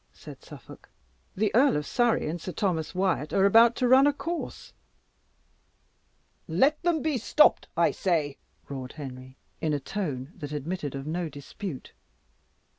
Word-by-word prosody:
said - - -12
Suffolk. - - -13 0.5
"The 205 +1 0
Earl 260 - +4
of 150 - -3
Surrey 240 - +1
and 165 +2 -4
Sir 185 - -6
Thomas 170 -2 -1
Wyat 185 -5 0
are 195 - +4
about 230 +4 +6
to 250 - +1
run 265 +3 +6
a 290 - +3
course." 335 +4 -6 1.7
"Let 265 - +2
them 335 -4 +1
he 300 -5 0
stopped 300 +7 +4
I - - +4
say!" 155 -7 -1 0.3
roared 130 -2 -7
Henry, 130 -3 -9 0.2
in 155 -1 0
a 145 - 0
tone 145 -5 -4
that 150 -3 -7
admitted 150 -1 -4
of 135 0 -6
no 165 +2 -3
dispute. 145 +2 -8
175 Hz, 150 wpm, -27 LUFS, 145-235 Hz, 1.7 s, about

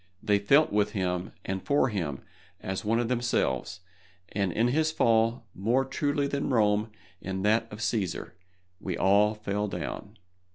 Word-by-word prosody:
They 100 -1 +3
felt 140 +10 +4
with 105 0 +1
him 90 -2 -2
and 95 0 -3
for 140 -2 +2
him 85 - -3 0.4
as 95 0 -4
one 110 +2 +1
of 120 - 0
themselves, 115 - -1 0.5
and 100 -3 0
in 115 +7 +2
his 155 +4 +1
fall, 115 -3 +2
more 120 +7 +1
truly 145 +1 0
than 140 0 -2
Rome 105 -3 +2 0.3
in 95 0 -4
that 110 +2 +2
of 105 +1 -8
Cæsar, 105 -5 -2 0.5
we 95 -4 -4
all 105 +3 +4
fell 105 0 -2
down. 105 +1 -6
105 Hz, 155 wpm, -28 LUFS, 95-120 Hz, 0.5 s, felt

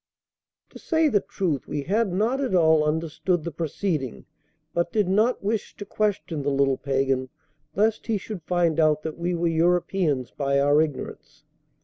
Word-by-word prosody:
To - - -12
say 320 -2 +2
the 210 - +3
truth, 185 -7 -3
we 145 -1 -3
had 205 +4 +1
not 225 +9 0
at 255 -8 0
all 160 -3 +4
understood 160 +2 -1
the 170 - -4
proceeding, 155 - -3 0.5
but 170 - 0
did 210 -5 +1
not 215 +6 +2
wish 210 +1 -2
to 205 - -8
question 200 -7 -1
the 140 - -1
little 135 -1 +2
pagan, 135 -1 0 0.5
lest 215 +3 +1
he 225 -2 +1
should 200 -1 -7
find 170 -1 +1
out 155 -1 +3
that 160 0 -5
we 175 +1 -1
were 170 0 -1
Europeans 165 -4 +1
by 140 -1 0
our 145 +2 +4
ignorance. 150 -4 -5
170 Hz, 165 wpm, -25 LUFS, 150-200 Hz, 0.5 s, all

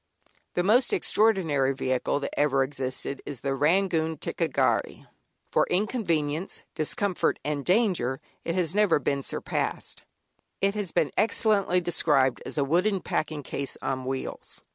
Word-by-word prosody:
The 175 - +2
most 235 +6 +3
extraordinary 160 -11 +2
vehicle 130 +2 0
that - - -4
ever 135 -2 +3
existed 135 0 -4
is 140 -5 -7
the 135 -1 -1
Rangoon 160 +2 +1
"ticca 165 +3 -2
gharry." - - 0 0.5
For - - +3
inconvenience, 175 - -1
discomfort, 185 +4 +1
and 145 -1 -2
danger, 180 - +1 0.2
it 165 - -2
has 175 -3 0
never 205 -4 +4
been 140 0 -1
surpassed. - - -3 0.6
It 195 0 +2
has 205 -5 -3
been 145 - +1
excellently 205 -5 +2
described 150 -6 +2
as - - -5
"a 145 - +3
wooden 180 +7 +1
packing 155 -2 -2
case 140 +1 -4
on 130 -1 -2
wheels." 130 0 -5
160 Hz, 140 wpm, -27 LUFS, 140-195 Hz, 0.6 s, never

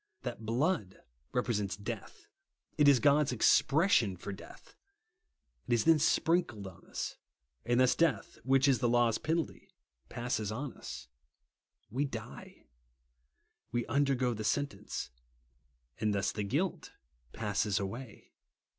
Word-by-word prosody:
That 110 - -5
blood 125 - 0 0.3
represents 105 -6 -1
death; 100 - -7 0.5
it 150 - +4
is 140 -3 +7
God's 145 0 +4
expres 150 - +4
sion 100 - +3
for 100 - -6
death. 95 - -13 0.9
It - - +1
is 115 - +1
then 165 -1 +6
sprinkled 160 - +1
on 95 -2 -11
us, - - -4 0.5
and 120 +1 +3
thus 130 -1 +5
death, 165 -2 0
which 135 +1 +4
is 130 -4 +4
the 120 - +2
law's 120 -2 +3
penalty, 160 0 -2 0.4
passes 120 -4 -2
on 125 +4 -4
us. - - -8 0.8
We 135 +6 0
die. 120 -3 -9 1.1
We 120 0 -1
undergo 130 -1 +1
the 110 -1 -5
sentence; 140 - -2 0.9
and 105 -1 +1
thus 100 0 0
the 105 - -3
guilt 155 - -2 0.4
passes 105 -2 0
away. 110 +4 -7
120 Hz, 130 wpm, -32 LUFS, 105-140 Hz, 1.1 s, is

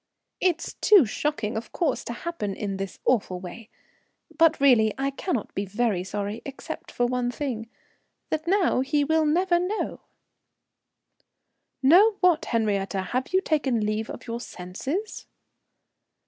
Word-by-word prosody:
"It's 345 -3 0
too 400 -9 +7
shocking, 225 -1 -2
of 220 0 -5
course, 320 -7 -1
to 235 - -4
happen 235 - -4
in 200 -1 -3
this 195 -1 -5
awful 200 -7 +1
way. 210 +5 -9 0.7
But 325 0 +4
really, 235 -6 +5
I 275 +1 -1
cannot 275 - -3
be 200 - -2
very 205 -2 0
sorry 205 +3 -4
except 275 -1 -7
for 245 - 0
one 245 0 0
thing 240 -4 -4 0.6
that 315 +1 -2
now 375 -6 +3
he 290 +2 +1
will 315 +1 +2
never 345 +3 +3
know." 380 +5 -2 1.8
"Know 375 +11 +7
what, 350 -4 +3
Henriette? 210 -4 0
Have 200 +7 -2
you 375 +1 +3
taken 270 - 0
leave 215 +1 -2
of - - -8
your 235 0 -4
senses?" 260 - -5
250 Hz, 140 wpm, -26 LUFS, 215-320 Hz, 1.8 s, too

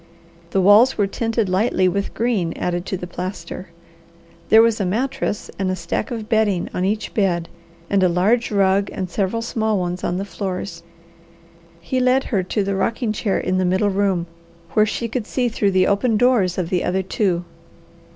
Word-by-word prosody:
The 190 - +1
walls 210 +7 +6
were 205 - +3
tinted 225 +1 -1
lightly 185 0 +2
with 200 +2 -2
green 220 -8 0
added 175 +1 -3
to 190 - -2
the 180 - -6
plaster. 180 0 -6 0.8
There 220 +1 +8
was 230 -1 +2
a - - +2
mattress 255 +2 -2
and 190 -1 0
a 185 - 0
stack 170 +4 -3
of 225 -3 -5
bedding 215 -5 +1
on 180 - -1
each 210 +3 -1
bed, 175 -5 +1 0.4
and 200 +1 +2
a 185 - +4
large 205 +8 +2
rug 200 -1 +2
and 185 -4 -5
several 205 +5 -1
small 220 -2 0
ones 180 0 -3
on 175 - -1
the 195 - -3
floors. 185 -2 -5 1.0
He 260 +8 -2
led 255 +1 +3
her 195 - +3
to 195 +3 -1
the 195 0 -1
rocking 225 +4 -1
chair 205 -1 -1
in 185 +1 0
the - - +2
middle 190 +3 +2
room, 190 -3 0 0.5
where 215 0 +3
she 230 +2 -2
could 230 -1 -4
see 250 -2 0
through 210 -3 +1
the 185 -1 +3
open 215 +3 +2
doors 225 -7 +3
of 180 -2 -2
the 180 -2 +1
other 190 +1 0
two. 180 -2 -1
195 Hz, 190 wpm, -21 LUFS, 185-220 Hz, 1.0 s, There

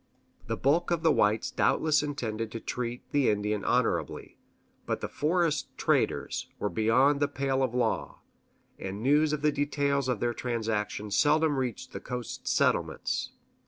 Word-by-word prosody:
The - - -2
bulk 145 +6 +2
of 170 -1 0
the 160 - +5
whites 105 -4 +2
doubtless 155 -2 +2
intended 115 -7 -3
to 115 - -4
treat 120 +1 -4
the 145 -3 +3
Indian 105 0 0
honorably; - - -1 0.5
but - - -1
the - - -3
forest 155 0 0
traders - - 0
were 105 - -1
beyond 130 +6 +3
the 145 - +2
pale 135 -1 -1
of 125 -2 0
law, 125 - -1 0.6
and 100 +3 -5
news 150 +3 +4
of 150 -1 -2
the 150 - +4
details 140 -2 0
of 125 -5 0
their 120 0 0
transactions 110 -4 -2
seldom 155 0 +3
reached 125 -4 -3
the - - -4
coast 125 -1 -6
settlements. - - 0
130 Hz, 155 wpm, -29 LUFS, 115-145 Hz, 0.6 s, the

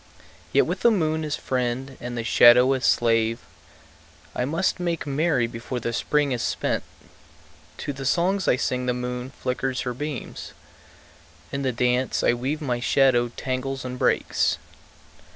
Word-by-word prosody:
Yet - - +4
with - - -3
the 235 - +5
moon 160 -7 0
as 150 -1 -2
friend 130 +1 -2
and 120 0 -5
the 115 - -2
shadow 125 +3 +6
as 130 - -1
slave 115 -1 +2 1.0
I 125 - 0
must 165 +7 0
make 170 -3 -2
merry 145 -2 +1
before 115 +2 -5
the 115 0 -3
Spring 145 +3 +1
is 120 -2 -1
spent. - - -1 1.0
To 145 - -4
the 135 0 -7
songs 185 +5 +1
I - - +5
sing 125 -1 -2
the 125 - +1
moon 125 0 -4
flickers 130 -1 -3
her 125 - -3
beams; 145 0 -6 1.0
In 140 - -3
the 130 -2 0
dance 125 +2 0
I - - +4
weave 135 +6 -3
my 125 -4 -1
shadow 125 -1 +3
tangles 130 0 -3
and 125 0 -5
breaks. - - +1
130 Hz, 155 wpm, -24 LUFS, 125-145 Hz, 1.0 s, shadow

